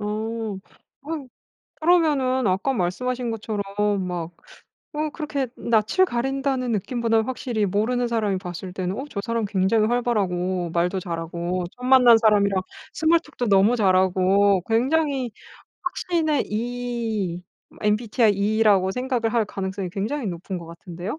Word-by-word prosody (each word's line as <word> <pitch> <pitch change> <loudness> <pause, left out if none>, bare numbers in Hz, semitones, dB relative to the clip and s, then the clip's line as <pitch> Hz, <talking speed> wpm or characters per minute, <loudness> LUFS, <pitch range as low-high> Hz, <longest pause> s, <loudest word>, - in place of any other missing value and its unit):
어. 215 0 -3 0.5
어 305 -2 -5 0.5
그러면은 295 -7 +2
아까 195 +9 +1
말씀하신 245 +5 -1
것처럼 220 -2 -3 0.5
막 175 -2 -4 0.6
어 305 +1 -1
그렇게 290 -4 -3
낯을 230 - +2
가린다는 265 0 -1
느낌보다는 225 +1 0
확실히 240 -4 -2
모르는 235 +6 0
사람이 215 -5 0
봤을 180 0 -7
때는 185 0 -3
어 265 - -3
저 200 - -4
사람 230 -1 -1
굉장히 200 +2 +2
활발하고 185 -7 0
말도 180 +2 +1
잘하고 170 +1 -3
처음 250 +1 -5
만난 250 -3 +8
사람이랑 200 -4 +3 0.3
스몰 320 +1 +3
톡도 300 -7 -5
너무 200 +3 +4
잘하고 190 -1 +3
굉장히 265 +1 +1 0.5
확신의 335 -4 0
E 225 -5 -3 0.4
MBTI 215 +1 +2
E라고 200 -1 +3
생각을 250 -1 -1
할 230 - +3
가능성이 190 -2 -4
굉장히 220 +8 -3
높은 180 +2 -5
것 170 - -8
같은데요? 175 - -7
220 Hz, 310 characters per minute, -23 LUFS, 190-250 Hz, 0.6 s, 만난